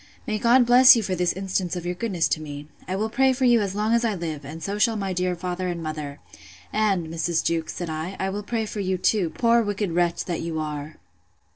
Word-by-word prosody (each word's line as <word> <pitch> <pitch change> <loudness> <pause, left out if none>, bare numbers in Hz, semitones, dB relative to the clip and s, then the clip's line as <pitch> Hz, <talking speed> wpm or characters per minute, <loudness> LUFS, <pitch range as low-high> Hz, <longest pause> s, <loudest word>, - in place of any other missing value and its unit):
—May 215 -1 -2
God 240 +3 +5
bless 250 +2 +8
you 230 - 0
for 190 - -2
this 180 -1 +1
instance 190 -2 -2
of 175 -1 -5
your 175 - -1
goodness 180 -3 -1
to 155 - 0
me! 145 -1 -8 0.2
I 185 - -2
will 215 +3 -1
pray 265 +3 +2
for 255 +1 0
you 240 -2 +5
as 195 -1 -2
long 215 +2 +1
as 235 0 +3
I 220 -3 0
live, 160 -4 -5
and 155 +4 -8
so 200 +1 -3
shall 225 +1 +3
my 195 -3 -2
dear 180 0 -1
father 180 +1 -3
and 170 -2 -4
mother. 150 -2 -5 0.5
And, 200 -5 +1
Mrs. 165 +1 -1
Jewkes, 165 -1 -1
said 175 - -4
I, 160 +5 -4
I 190 0 -1
will 205 +2 -4
pray 225 +1 -2
for 210 - -6
you 190 -1 -1
too, 185 -1 +1
poor 235 +5 +3
wicked 205 -3 -2
wretch 175 0 0
that 175 -2 -3
you 165 -1 -4
are! 150 0 -5
185 Hz, 245 wpm, -24 LUFS, 165-215 Hz, 0.5 s, bless